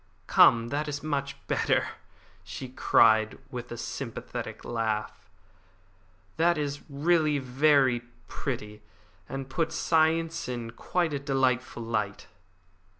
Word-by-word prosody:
"Come, 115 0 +5
that 150 +3 -2
is 145 -1 -4
much 140 -2 -2
better," - - +1 0.5
she 130 - -7
cried, 110 -3 +4
with 125 -1 -6
her 120 - -6
sympathetic - - -6
laugh. 110 -5 -3 1.1
"That 170 +1 +3
is 145 -1 -3
really 155 +1 +2
very 135 -1 +3 0.3
pretty, 105 0 -5 0.5
and 135 -1 -5
puts 155 +5 -1
science 165 -2 +1
in 120 -2 -4
quite 170 +6 -1
a 140 - -1
delightful 130 -3 0
light." 105 -3 -2
135 Hz, 110 wpm, -28 LUFS, 115-150 Hz, 1.1 s, Come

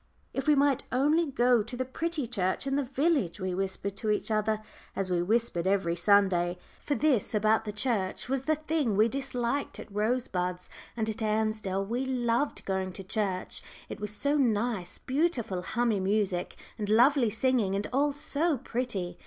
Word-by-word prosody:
"If 270 +1 -3
we 300 - +6
might 280 -1 +3
only 300 +6 +3
go 245 -3 +3
to 235 +4 -6
the 255 - -1
pretty 320 +2 -2
church 195 -2 -1
in 275 0 0
the 285 - +2
village!" 270 - 0
we 185 -1 -2
whispered 195 +1 -3
to 215 - -2
each 210 +1 0
other, 215 0 +1 0.4
as 190 -1 -2
we 175 -1 +2
whispered 200 -2 0
every 190 -4 +1
Sunday. 180 -2 +3 0.3
For 290 - 0
this 270 -9 +1
about 215 +1 +3
the 210 - -3
church 210 -3 -1
was 265 0 -1
the 310 - +3
thing 305 -8 -1
we 215 +2 +5
disliked 265 +1 -2
at 205 - -10
Rosebuds, 200 -5 -1 0.3
and 220 -1 0
at 220 +1 -3
Ansdell 215 -3 0
we 240 +5 -2
loved 250 +1 0
going 190 -1 -1
to 195 - -7
church. 190 -1 -2 0.3
It - - -6
was 210 0 -3
so 285 +7 0
nice; 225 -6 0
beautiful 260 - -1
hummy 230 +2 0
music 190 -2 0 0.2
and 205 -1 -2
lovely 245 +2 +5
singing, 225 -3 +1
and 200 +1 -1
all 285 +2 +3
so 290 +2 0
pretty. 225 -8 -3
220 Hz, 175 wpm, -29 LUFS, 195-265 Hz, 0.4 s, we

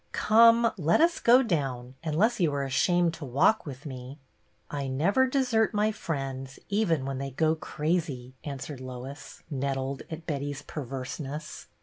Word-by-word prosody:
" - - -41
Come, 230 +1 +6
let 165 +1 +3
us 335 +1 +3
go 250 +3 +6
down, 135 - -2
unless 200 +10 +1
you 170 -5 +3
are 140 - 0
ashamed 170 +6 +2
to 165 - -8
walk 140 - +2
with 135 +1 -8
me." 130 0 -7 0.3
" - - -26
I 140 -2 -3
never 195 - +2
desert 245 -5 +1
my 210 +1 +2
friends, 135 -8 -4
even 175 -9 +1
when 135 -1 -3
they 135 0 -3
go 155 +4 +2
crazy," 150 -5 -2
answered 140 -1 -6
Lois, 130 +2 -8
nettled 135 0 -2
at 160 0 -7
Betty's 145 -2 -3
perverseness. 140 +2 -6
150 Hz, 155 wpm, -28 LUFS, 135-185 Hz, 0.3 s, Come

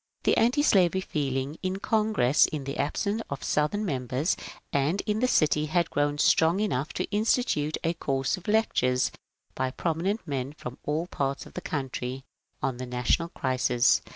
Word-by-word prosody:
The - - +3
antislavery 215 - +3
feeling 140 -3 -2
in 185 0 -2
Congress, 210 - +3
in 150 -3 -4
the 140 +1 -5
absence 200 +9 0
of 140 - -5
Southern 205 +8 0
members, 130 - 0 0.4
and 145 +7 +1
in 210 0 -1
the 255 - +2
city 155 -7 +2
had 170 +2 +1
grown 145 0 +1
strong 165 +4 +4
enough 155 -8 -1
to - - -1
institute 210 - +1
a 165 - +1
course 135 -4 -1
of 185 -3 -13
lectures 130 - +2 0.4
by 130 0 -1
prominent 170 - -2
men 135 -1 -3
from 125 -3 -8
all 155 +3 0
parts 140 -5 -2
of - - -14
the 180 - -5
country 135 -5 -4 0.4
on 130 -2 0
the 130 0 -5
national 125 +7 0
crisis. 130 -4 +2
150 Hz, 160 wpm, -27 LUFS, 135-190 Hz, 0.4 s, strong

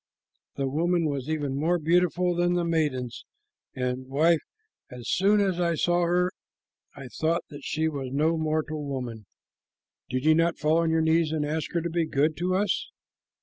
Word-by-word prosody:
The 135 -1 -1
woman 170 +4 +1
was 140 -1 -3
even 145 -4 -1
more 170 +4 +2
beautiful 175 +2 +2
than 175 0 +1
the 175 -1 0
maidens, 150 -7 -1 0.5
and, 125 0 -3
wife, 155 +5 +3 0.5
as 125 -2 -9
soon 205 +3 +3
as 190 -3 +1
I 170 -1 +1
saw 175 +2 +2
her 180 +1 +2 0.6
I 135 -2 -9
thought 165 +6 -1
that 145 0 -10
she 160 +1 -1
was 140 -4 -4
no 155 +4 +2
mortal 155 -1 -1
woman." 125 -7 -5 0.8
"Did 130 +3 -2
you 155 - +6
not 165 +1 +2
fall 155 +2 +2
on 165 -1 +1
your 160 0 +2
knees 160 0 +2
and 155 -2 -1
ask 155 +1 -3
her 170 - +1
to 170 - -3
be 165 -1 0
good 150 +2 +1
to 180 +2 0
us?" 200 0 0
160 Hz, 180 wpm, -26 LUFS, 145-170 Hz, 0.8 s, you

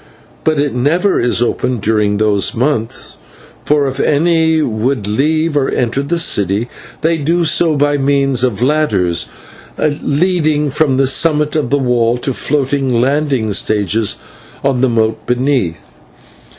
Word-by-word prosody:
But 155 -1 +1
it 145 -1 0
never 165 +11 +1
is 120 0 +1
opened 120 -1 -2
during 105 -1 +1
those 105 -2 +1
months, 120 -2 -2 0.5
for 145 -1 +1
if 135 - -5
any 160 +1 +2
would 115 -1 -1
leave 155 +9 0
or 140 -2 +1
enter 125 +2 -1
the 170 +5 -2
city 105 - +1 0.3
they 165 +1 +1
do 165 +3 0
so 160 +1 +2
by 145 0 +1
means 135 -2 +1
of 120 -3 0
ladders 130 - +1 0.5
leading 150 0 0
from 145 -2 +1
the 135 - +3
summit 150 +2 +1
of 150 -6 0
the 145 - +2
wall 120 -3 +1
to 130 +2 -3
floating 135 -3 0
landing 135 -4 0
stages 105 +1 0 0.5
on 135 -3 +1
the 130 - +3
moat 110 -1 0
beneath. 125 - -1
135 Hz, 140 wpm, -14 LUFS, 115-150 Hz, 0.5 s, the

